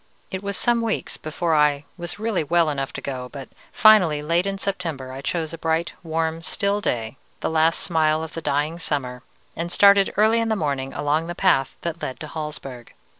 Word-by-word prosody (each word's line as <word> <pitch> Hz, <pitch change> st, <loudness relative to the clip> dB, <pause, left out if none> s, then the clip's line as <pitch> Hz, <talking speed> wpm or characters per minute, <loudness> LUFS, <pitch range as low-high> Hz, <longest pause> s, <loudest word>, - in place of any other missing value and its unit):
"It 190 Hz, -1 st, -3 dB
was 200 Hz, -1 st, -3 dB
some 240 Hz, -1 st, +2 dB
weeks 225 Hz, -1 st, -2 dB
before 160 Hz, +2 st, -2 dB
I 150 Hz, -1 st, +3 dB
was 175 Hz, -2 st, -6 dB
really 215 Hz, -5 st, -1 dB
well 165 Hz, 0 st, +2 dB
enough 135 Hz, -2 st, -3 dB
to -, -, -6 dB
go, 130 Hz, -2 st, -5 dB
but 135 Hz, -1 st, -9 dB, 0.2 s
finally, 180 Hz, -9 st, +5 dB
late 170 Hz, +5 st, +1 dB
in 195 Hz, 0 st, -2 dB
September, 165 Hz, -10 st, -3 dB
I 135 Hz, +1 st, -7 dB
chose 160 Hz, +2 st, -2 dB
a 165 Hz, -, -7 dB
bright, 165 Hz, +1 st, 0 dB
warm, 160 Hz, 0 st, -2 dB
still 200 Hz, +4 st, 0 dB
day, 115 Hz, -, -2 dB, 0.2 s
the -, -, -1 dB
last 160 Hz, +1 st, +3 dB
smile 160 Hz, -4 st, +1 dB
of 160 Hz, -, -7 dB
the 165 Hz, -, -5 dB
dying 150 Hz, +3 st, -1 dB
summer, 130 Hz, -6 st, -3 dB, 0.3 s
and 170 Hz, +1 st, -4 dB
started 200 Hz, 0 st, +6 dB
early 220 Hz, +2 st, +4 dB
in 230 Hz, 0 st, 0 dB
the 220 Hz, -, +2 dB
morning 140 Hz, -7 st, -2 dB
along 150 Hz, +3 st, 0 dB
the 175 Hz, -, -5 dB
path 170 Hz, -9 st, +2 dB
that 170 Hz, -1 st, -4 dB
led 130 Hz, -, -4 dB
to 155 Hz, -, -5 dB
Hallsberg. 145 Hz, -6 st, -6 dB
160 Hz, 200 wpm, -23 LUFS, 145-185 Hz, 0.3 s, started